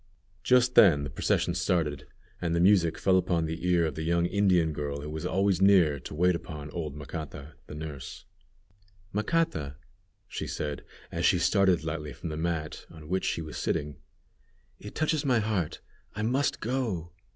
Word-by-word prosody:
Just 125 +2 +4
then 75 -12 +6
the 70 - -5
procession - - 0
started, 75 -5 -1 0.3
and 85 -2 0
the - - +2
music 85 -3 +4
fell 95 -1 +3
upon 85 -3 +1
the 80 +3 -4
ear 85 -2 +3
of 80 - -2
the 80 - -5
young 85 +1 +1
Indian 90 -4 +2
girl 70 -1 -4
who 75 - -6
was 80 0 -3
always 95 -1 +1
near 90 -7 +5
to 65 - -8
wait 90 +3 +3
upon 75 -4 -6
old 75 -5 -4
Macata, 75 -1 -7
the 75 - -8
nurse. 75 -4 -7 0.9
"Macata," 105 - 0 0.5
she - - -5
said, 75 -1 -4 0.3
as - - -3
she - - +4
started 95 -5 +3
lightly 75 -2 -4
from 85 - -6
the 75 - -4
mat 80 -1 -3
on 80 -2 -12
which 95 +1 0
she 80 - -1
was 80 - -7
sitting, 75 0 -2 0.8
"it 105 - -10
touches 155 -1 +1
my 130 -3 +3
heart; 105 -7 -1 0.3
I 105 - -3
must 130 +5 0
go! 110 -9 -2
85 Hz, 175 wpm, -28 LUFS, 75-100 Hz, 0.9 s, then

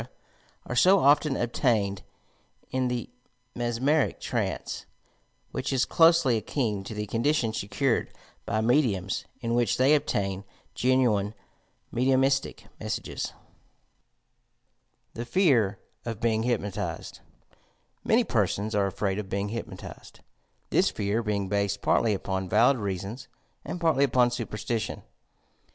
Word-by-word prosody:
are 125 - -4
so 185 +9 +6
often 145 -2 +4
obtained 110 -6 0 0.7
in 130 -1 0
the 125 -1 -2 0.5
mesmeric 120 +6 +1
trance, - - -3 0.6
which 135 - -3
is 130 -2 +2
closely 165 -7 +5
akin 110 -2 -2
to 105 - -7
the 105 0 -3
condition 115 +1 0
secured 115 +5 0 0.3
by 110 - -1
mediums, 110 -7 +1 0.2
in 115 -1 -1
which 120 -3 +2
they 130 +4 +5
obtain 100 -9 0 0.3
genuine 120 -5 +2 0.6
mediumistie 135 +2 +1
messages. - - -4 1.8
THE 115 - -4
FE.VB 120 - +3 0.3
OF 115 -3 -4
BEING 115 -1 +1
HTPNOTIZED 110 -5 -3 0.9
Ulany - - +3
persona 105 +2 0
are 100 - +2
afraid 95 +1 -2
of 100 -2 -6
being 100 +1 -2
hypnotized, 115 +2 -8 0.3
— - - -44
^thia - - +3
fear 105 +2 -1
being 105 -3 -1
based 100 0 -1
partly 110 -3 +3
upon 95 -1 -3
valid 120 +7 +4
reasons 100 +5 -4 0.4
and 180 - -5
partly 160 -5 +3
upon 125 -1 +3
superstition. 115 -2 -3
115 Hz, 115 wpm, -27 LUFS, 100-130 Hz, 1.8 s, so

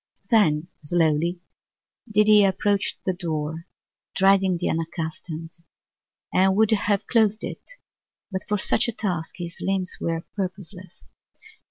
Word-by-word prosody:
Then 170 -8 +4 0.2
slowly 165 +2 +1 0.7
did 210 0 +4
he 210 -1 +7
approach 200 +1 +1
the 185 - +1
door, 160 -1 -4 0.5
dreading 195 -1 +4
the - - -2
unaccustomed, 165 0 -4 0.8
and 190 +1 +4
would 220 +1 +3
have 205 -2 +1
closed 215 -2 +2
it, - - -7 0.6
but 190 -1 -2
for 210 - +1
such 225 +4 +2
a 235 - -2
task 180 -7 -3
his 170 -1 -7
limbs 190 -1 -1
were 165 0 -2
purposeless. 185 -2 -5
185 Hz, 125 wpm, -24 LUFS, 165-205 Hz, 0.8 s, he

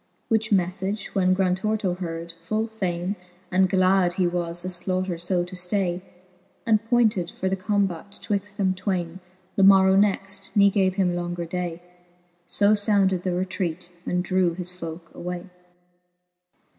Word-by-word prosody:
Which 220 -1 +1
meflage 190 +2 0
when 185 -1 +3
Grantorto 190 +1 0
heard, 165 -1 -5
full 215 +5 0
fayne 190 -4 -2 0.4
And 185 0 +3
glad 185 -1 +3
he 185 0 +1
was 175 0 -1
the 185 - -3
flaiighter 185 +1 -1
fb 175 +1 0
to 180 +1 -9
ftay, 180 0 0 0.6
And 220 -1 +3
pointed 215 -8 +2
for 190 - 0
the 190 - +1
combat 195 -1 -1
twixt 205 0 -3
them 190 -2 +2
twayne 185 -2 -3 0.4
The 195 - +4
morrow 190 -1 +7
next, 195 -1 +1
ne 200 -1 +6
gave 190 -2 +2
him 180 -3 +1
longer 175 0 -3
day. 175 0 -4 0.6
So 205 +3 +3
founded 200 -3 +2
the 185 - -2
retraite, 180 -2 -3
and 180 0 -1
drew 185 -2 +1
his 180 0 -4
folke 165 -1 -8
away. 180 +1 -6
185 Hz, 145 wpm, -25 LUFS, 175-195 Hz, 0.6 s, morrow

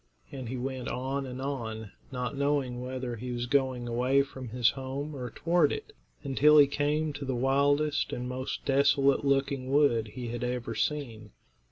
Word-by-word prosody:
And 130 -4 -6
he 130 - -3
went 130 0 -4
on 135 +2 -2
and 125 0 -6
on, 115 -6 -4 0.2
not 125 +1 -3
knowing 140 -3 0
whether 125 -1 -4
he 125 +3 -5
was 120 0 -2
going 130 -2 +1
away 125 +4 +2
from 130 -3 -9
his 120 +1 +3
home 140 +3 -5
or 125 -2 -5
toward 165 +2 +2
it, - - -5 0.3
until 150 +3 +5
he 145 - +9
came 150 +2 0
to 145 0 -6
the 130 -2 -2
wildest 140 +4 +2
and 125 0 -4
most 130 +1 -4
desolate 140 0 +3
looking 135 -1 0
wood 135 -6 +3
he 125 -2 -5
had 120 +1 -4
ever 125 -2 -2
seen. 115 -7 -3
130 Hz, 175 wpm, -29 LUFS, 125-140 Hz, 0.3 s, he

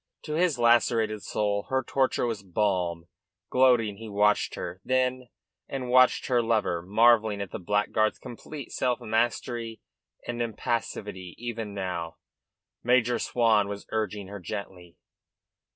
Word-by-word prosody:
To 155 - -5
his 165 -3 +2
lacerated 115 -2 +3
soul 100 0 -1
her 130 0 +1
torture 130 0 +1
was 115 -4 -2
a 100 - -22
balm. 90 -4 0 0.5
Gloating, 120 -5 +4
he 110 0 -8
watched 105 +1 +2
her, 90 +2 -6
then, 130 0 0 0.4
and 130 -2 -4
watched 130 0 +5
her 125 -2 +2
lover, 110 -7 0
marvelling 110 +2 +4
at 100 -2 -5
the - - -5
blackguard's 105 +3 +1
complete 135 +3 -9
self 125 -2 0
mastery 115 0 -1 0.5
and 120 0 -3
impassivity 105 -5 -3
even 115 -3 -5
now. 90 -3 -4 0.6
Major 120 0 +2
Swan 110 -4 +2
was 100 0 -6
urging 105 -2 -2
her 100 +1 -7
gently. 90 -2 -7
110 Hz, 135 wpm, -27 LUFS, 100-120 Hz, 0.6 s, watched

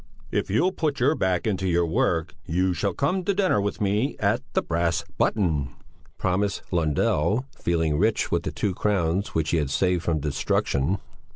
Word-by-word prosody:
"If - - -1
you'll 140 - +2
put 150 -6 -1
your 135 +5 +4
back 95 - 0
into 95 -3 0
your 85 -1 +2
work, 80 0 0
you 90 +2 +1
shall 100 +1 -1
come 180 +7 0
to 200 +2 0
dinner 185 - +2
with 100 +2 -2
me 105 +6 0
at 105 +4 +1
the - - +1
'Brass 85 0 0 0.2
Button,'" 75 -9 +1 0.4
promised 100 +2 0
Lundell, 85 - +1
feeling 80 -3 0
rich 110 +3 +1
with - - +2
the - - -4
two 100 - -1
crowns 95 -1 0
which 80 -1 +1
he 85 - +2
had 75 -4 0
saved 90 +4 +1
from 80 -2 0
destruction. 70 +3 0
95 Hz, 175 wpm, -25 LUFS, 80-105 Hz, 0.4 s, your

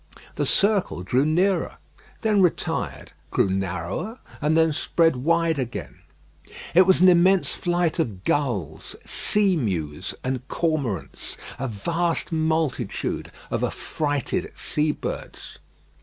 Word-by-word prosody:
The - - -1
circle 200 - +2
drew 130 +9 +2
nearer, 185 +5 +1 0.5
then 215 -3 +3
retired; 180 -3 -1 0.2
grew - - +2
narrower, 95 - -3 0.2
and 155 +2 +2
then 160 -1 +4
spread 165 -1 +2
wide 165 +3 +2
again. 115 - -5 0.7
It 185 +2 +6
was 190 -2 +5
an 185 - +8
immense 180 -3 +5
flight 175 -1 0
of 105 - -2
gulls, 100 - -1
seamews, 105 - 0
and 130 -1 -1
cormorants; 145 - -2 0.2
a 135 - -1
vast 165 +12 -1
multitude 160 -8 -1 0.2
of - - -1
affrighted 145 -4 -2
sea 150 0 0
birds. - - -7
155 Hz, 110 wpm, -24 LUFS, 120-175 Hz, 0.7 s, an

